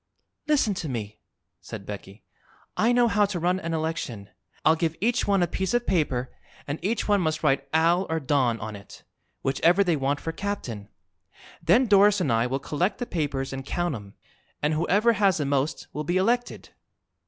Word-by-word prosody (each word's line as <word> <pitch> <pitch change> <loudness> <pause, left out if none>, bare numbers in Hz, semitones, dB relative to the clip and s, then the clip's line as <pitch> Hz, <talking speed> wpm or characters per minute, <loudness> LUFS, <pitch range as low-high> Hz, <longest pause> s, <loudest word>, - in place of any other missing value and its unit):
"Listen 285 -9 +2
to 170 -5 -4
me," 105 -4 -5 0.4
said 105 -4 -9
Becky. 100 0 -9 0.5
"I 230 +3 +3
know 245 0 +4
how 205 -1 +3
to 195 -3 -3
run 180 +2 +1
an 165 -2 -3
election. 150 -11 -4 0.4
I'll 160 - +6
give 165 0 -1
each 240 +3 +1
one 195 -3 +3
a - - +1
piece 190 +6 -1
of 240 0 +1
paper, 135 -9 0 0.3
and 145 +2 -4
each 220 +5 -1
one 205 -2 +3
must 155 -2 -1
write 140 -2 +1
'Al' 170 +4 +3
or 160 0 0
'Don' 130 -5 +1
on 105 0 -6
it, 100 0 -13 0.4
whichever 170 +8 +3
they 175 -4 +1
want 140 0 -1
for 165 - -4
captain. 130 - -5 0.7
Then 255 +3 +4
Doris 205 -1 +5
and 150 -8 0
I 115 +2 +2
will 130 +2 -1
collect 175 +8 -1
the 245 - -3
papers 140 - -2
and 135 0 -5
count 175 +4 -2
'em, 100 -4 -9 0.4
and 150 +1 0
whoever 200 +9 +3
has 200 -5 +3
the 150 - -1
most 140 +1 -1
will 150 - -3
be 175 +4 0
elected." 240 +6 0
160 Hz, 190 wpm, -26 LUFS, 135-195 Hz, 0.7 s, I'll